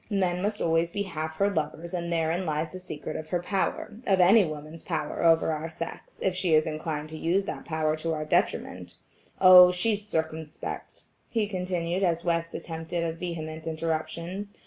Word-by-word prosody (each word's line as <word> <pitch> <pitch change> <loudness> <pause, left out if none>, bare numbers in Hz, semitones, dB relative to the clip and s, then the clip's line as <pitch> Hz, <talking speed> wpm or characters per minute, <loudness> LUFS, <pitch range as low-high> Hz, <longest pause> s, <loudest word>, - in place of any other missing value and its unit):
Men 185 -4 +1
must 205 +2 -1
always 165 0 +2
be 200 +3 -2
half 160 -4 -4
her 200 +5 +2
lovers 165 -1 -3
and 170 -1 -2
therein 165 +2 +1
lies 155 -1 -2
the 185 - -7
secret 155 -5 -6
of 155 0 -6
her 175 - +1
power–of 195 +2 -1
any 195 +4 +7
woman's 155 0 -6
power 155 -2 -3
over 165 -1 +4
our 155 +1 -3
sex, 165 +1 -7
if 190 - +2
she 180 -3 +2
is 155 - +4
inclined 155 -1 -3
to 160 - -7
use 185 +4 +2
that - - -6
power 155 -1 0
to 165 +1 -2
our 155 0 -3
detriment. 175 +5 -1 0.4
Oh! 180 -1 +10
she's 205 +3 0
circumspect," 160 -4 -4 0.3
he 220 -3 0
continued 180 -2 -2
as 170 -3 +1
West 170 -1 0
attempted 165 +1 -4
a 165 -1 -1
vehement 160 -2 -5
interruption. 165 +4 -3
170 Hz, 175 wpm, -27 LUFS, 160-185 Hz, 0.4 s, Oh